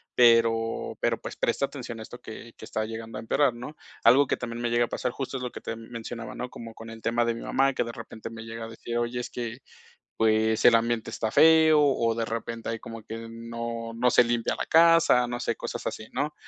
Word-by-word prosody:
pero 115 -1 +3
pero - - 0
pues, - - -7
presta - - +1
atención 120 -5 -7
a - - -6
esto 120 +2 -11
que 115 +1 -10
que - - -10
está 110 - -2
llegando 115 0 -7
a - - -5
empeorar, 130 +3 +2
¿no? 125 +6 -9 0.3
Algo 130 +4 +6
que - - +1
también 120 -1 -6
me 120 - 0
llega 120 0 +3
a - - -10
pasar, 125 - -2
justo 135 0 -4
es 125 - -6
lo 125 - -3
que - - -9
te 115 - -5
mencionaba, 115 0 -7
¿no? 125 0 -5
Como 115 -1 -9
con 115 0 -10
el 115 0 -10
tema 120 +1 +1
de 115 - +1
mi 115 - -7
mamá, 135 +1 +2
que - - 0
de 115 - -5
repente 115 -1 -8
me 115 -1 -9
llega 115 0 -7
a - - -7
decir: 115 +1 -5
"Oye, 120 +1 -1
es - - -6
que 120 0 -5 0.6
pues, 110 0 +2
el 120 - +8
ambiente 115 0 0
está 110 -1 -2
feo", 160 -1 +6
o 125 -5 +2
de 115 0 -1
repente 115 0 -4
hay 115 -1 -3
como 115 -1 -9
que 115 +1 -7
no 115 0 -5
no 125 +2 +3
se 120 - +6
limpia 120 -1 0
la - - -3
casa. 165 -6 +5
No 120 0 -4
sé - - -1
cosas - - -6
así, 110 - -5
¿no? 145 +4 -1
115 Hz, 245 wpm, -27 LUFS, 115-125 Hz, 0.6 s, el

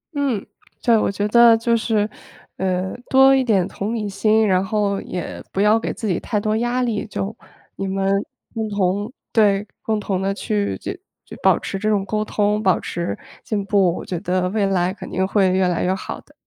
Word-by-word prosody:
嗯， 270 -8 -1 0.4
对。 235 - +5
我 215 - +1
觉 205 +1 -1
得 235 0 +7
就 230 +1 +1
是， 220 -2 +1 0.5
呃， 185 0 -1
多 270 +1 +6
一 265 - +3
点 200 -7 +2
同 205 +3 -4
理 215 -2 -2
心， 215 +2 +2
然 185 -1 +3
后 200 -1 0
也 180 -2 -6
不 - - -3
要 210 +2 +4
给 - - -3
自 225 - -5
己 180 - 0
太 210 - -1
多 215 +1 0
压 240 +2 0
力。 225 -4 -1
就 210 +1 -4 0.4
你 195 - -3
们 195 0 -1 0.5
共 220 -1 -3
同 200 +2 0 0.2
对， 205 -2 +3
共 220 -1 -1
同 195 -2 -2
地 195 +1 0
去 205 0 -2
就 - - -5 0.3
就 - - -10
保 - - +5
持 195 - -5
这 215 +2 0
种 200 -2 +1
沟 215 +2 -1
通、 210 0 0
保 190 -4 +3
持 170 -13 -4 0.3
进 205 -3 -2
步， 195 -4 +3
我 - - -7
觉 175 - -3
得 180 +1 0
未 205 0 +1
来 185 -1 +1
肯 205 - -9
定 190 +1 0
会 195 -1 +3
越 185 0 +2
来 175 -2 0
越 185 - +2
好 190 - -6
的。 - - -25
205 Hz, 220 characters per minute, -21 LUFS, 190-220 Hz, 0.5 s, 得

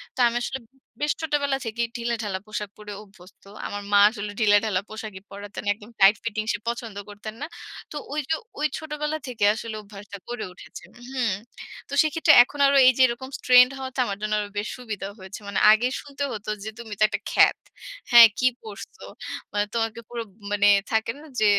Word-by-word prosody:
তো - - -10
আমি 235 - -2
আসলে 265 +2 -3
উ - - -30 0.2
বেশ 295 - +2
ছোটবেলা 285 -3 0
থেকেই 230 +1 -2
ঢিলেঢালা 225 -5 -2
পোশাক 210 -1 -4
পরে 210 -1 -9
অভ্যস্ত। 195 -3 -18 0.2
আমার 205 0 -5
মা 205 - +6
আসলে 210 -2 -6
ঢিলেঢালা 205 -2 +3
পোশাকেই 215 -3 -8
পড়াতেন। 205 +1 -8
একদম 210 +2 -15
টাইট 195 +2 +7
ফিটিং 215 -1 -2
সে 220 - -3
পছন্দ 235 -3 -5
করতেন 210 +1 -8
না। 295 - -3 0.4
তো - - -8 0.2
ওই 300 - -1
যে, 320 - +3 0.2
ওই 305 - +2
ছোটবেলা 300 0 -3
থেকে 240 -5 -4
আসলে 225 0 -6
অভ্যাসটা 200 0 -11
গড়ে 240 -2 -4
উঠেছে, 185 - -12 0.3
হুম। 250 -6 0 0.6
তো - - -8
সেক্ষেত্রে 315 +1 +4
এখন 285 +3 -12
আরো 280 - +4
এই - - +9
যে 260 - +3
এরকম 245 +2 -5 0.2
ট্রেন্ড 250 0 +7
হওয়াটা 260 0 -6
আমার 200 -3 -4
জন্য 215 0 -2
আরো 205 -1 -4
বেশি 205 +1 -2
সুবিধা 215 -5 -5
হয়েছে। 190 +1 -9
মানে 200 - -1
আগে 220 +3 +4
শুনতে 285 0 -6
হত 210 -1 -6 0.2
যে, 220 - -4
"তুমি 225 -3 -7
তো - - +4
একটা 205 -1 -3
খ্যাত। - - +5 0.5
হ্যাঁ, 235 -1 +11
কি 255 - +4
পড়ছো? 215 -1 -10 0.5
মানে 205 0 +1
তোমাকে 225 -1 -1
পুরো, 240 -1 -4 0.3
মানে 205 0 +3 0.2
থাকে 220 0 +1
না 300 - -14 0.2
যে, 215 - +3
220 Hz, 190 wpm, -24 LUFS, 205-250 Hz, 0.6 s, হ্যাঁ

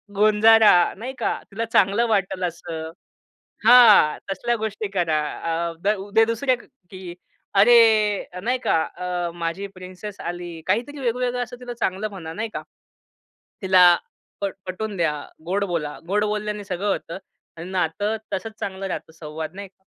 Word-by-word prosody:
गोंजारा, 215 +1 +6 0.3
नाही 255 +5 -6
का? - - 0
तिला 225 +3 -3
चांगलं 220 +2 +2
वाटेल 195 -3 0
असं. 165 -2 -6 0.8
हां, 230 -10 +7
तसल्या 235 +5 -1
गोष्टी 215 -1 -4
करा. 160 -3 +1 0.5
अ, 165 - -9
द 210 +2 +2
उद्या 225 +2 +4
दुसऱ्या 245 +3 0 0.3
की, 185 -2 -8 0.4
अरे 215 -3 +4
नाही 250 +3 0
का, 160 - +3
अ, 180 -1 -3
माझी 170 +3 -3
प्रिन्सेस 185 +3 -9
आली. 175 -1 -6
काहीतरी 250 +7 -1
वेगवेगळं 245 0 -1
असं 245 +1 -7
तिला 245 -1 -6
चांगलं 195 +3 -1
म्हणा, 165 -5 -8
नाही 225 +6 -4
का? - - -4 1.0
तिला 185 -1 +6 0.6
पट 200 -1 -2
पटवून 200 +3 -4
द्या, 165 -4 +1 0.3
गोड 195 +4 0
बोला. 165 -6 -3
गोड 210 +2 +1
बोलल्याने 210 0 -3
सगळं 195 +1 -3
होतं 170 -2 -3 0.4
आणि 170 +3 -7
नातं 190 +4 -1 0.2
तसंच 195 +3 -3
चांगलं 195 0 -4
राहतं. 160 - -6
संवाद 155 0 -7
नाही 200 0 -8
का? 190 +1 -44
200 Hz, 145 wpm, -23 LUFS, 175-220 Hz, 1.0 s, हां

